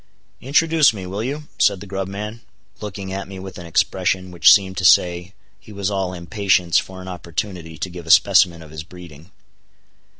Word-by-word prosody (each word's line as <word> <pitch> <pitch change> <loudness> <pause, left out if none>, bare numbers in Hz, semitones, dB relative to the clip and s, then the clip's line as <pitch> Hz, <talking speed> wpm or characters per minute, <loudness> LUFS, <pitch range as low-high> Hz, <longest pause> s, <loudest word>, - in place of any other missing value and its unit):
"Introduce 155 -2 +3
me, 95 -2 -7
will 100 +4 -4
you?" 145 +5 -4 0.2
said 100 -2 +3
the 100 - -9
grub 95 -1 -4
man, 105 +4 -6 0.4
looking 100 -2 -6
at 95 0 -5
me 95 0 -9
with 95 0 -9
an 85 - -9
expression 95 +2 0
which 85 -2 +6
seem 95 -2 +4
to 95 - -5
say 90 +1 +3 0.2
he 110 - -15
was 100 -1 -3
all 95 -2 -2
impatience 90 -1 +1
for 95 -1 -9
an - - -11
opportunity 85 -1 -6
to - - -3
give 90 -2 -10
a - - -8
specimen 85 0 +5
of 75 - -14
his 80 -1 -7
breeding. 85 -2 -14
95 Hz, 190 wpm, -20 LUFS, 90-100 Hz, 0.4 s, which